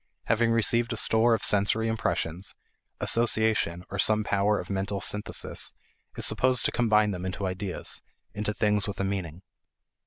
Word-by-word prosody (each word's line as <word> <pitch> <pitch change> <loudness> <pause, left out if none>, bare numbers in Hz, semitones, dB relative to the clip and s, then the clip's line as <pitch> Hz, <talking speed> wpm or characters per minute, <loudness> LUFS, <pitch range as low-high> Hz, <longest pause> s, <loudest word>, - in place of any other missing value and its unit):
Having 115 0 +1
received 115 +1 +2
a - - -5
store 115 +1 +3
of - - -6
sensory 105 +2 +2
impressions, 90 -4 -1 0.4
association 110 -6 +2
or 100 - -5
some 110 +3 +2
power 100 +1 +1
of - - -7
mental 100 +1 -2
synthesis 105 +1 -2 0.4
is - - 0
supposed 130 -1 +2
to - - +1
combine 110 -3 +2
them 90 -2 -6
into 95 +1 -4
ideas 95 0 -4 0.3
into 105 +1 -3
things 105 -2 +1
with 100 - -6
a - - 0
meaning. 95 -3 -4
105 Hz, 155 wpm, -27 LUFS, 95-110 Hz, 0.4 s, store